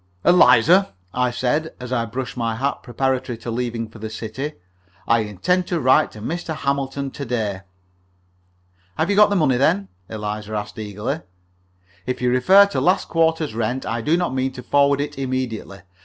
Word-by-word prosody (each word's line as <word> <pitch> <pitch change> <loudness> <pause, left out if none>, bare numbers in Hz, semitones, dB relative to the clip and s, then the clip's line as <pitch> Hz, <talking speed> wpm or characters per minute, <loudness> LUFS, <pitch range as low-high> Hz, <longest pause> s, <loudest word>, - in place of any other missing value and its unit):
"Eliza," 175 - +5 0.2
I 125 0 +1
said, 130 +6 -1
as 125 0 -7
I 115 -2 0
brushed 125 +3 -5
my 115 -2 -1
hat 135 +4 -2
preparatory 130 -1 -2
to 115 - -6
leaving 115 -1 -3
for 110 +1 -14
the 110 +1 -5
city, 115 +7 -5 0.5
"I 115 - +4
intend 110 - 0
to 175 - -1
write 130 -3 +4
to 105 - -10
Mr. 165 +5 -4
Hamilton 140 -1 -2
to 140 - -6
day." 110 -6 -2 1.4
"Have 160 +5 +1
you - - +2
got 210 0 +6
the 205 - 0
money, 145 -8 +3
then?" 100 -7 +2 0.2
Eliza 105 0 -5
asked, 105 0 -5
eagerly. 105 -1 -4 0.9
"If 125 - -2
you 125 0 +1
refer 185 +11 +6
to 200 - -2
last 185 +2 +2
quarter's 160 -4 +1
rent, 120 +3 -2
I 115 -1 -2
do 155 +8 +2
not 175 -6 -1
mean 130 0 0
to 125 -1 -9
forward 140 +2 +3
it 145 -1 -5
immediately. 125 -7 -3
125 Hz, 175 wpm, -21 LUFS, 115-150 Hz, 1.4 s, got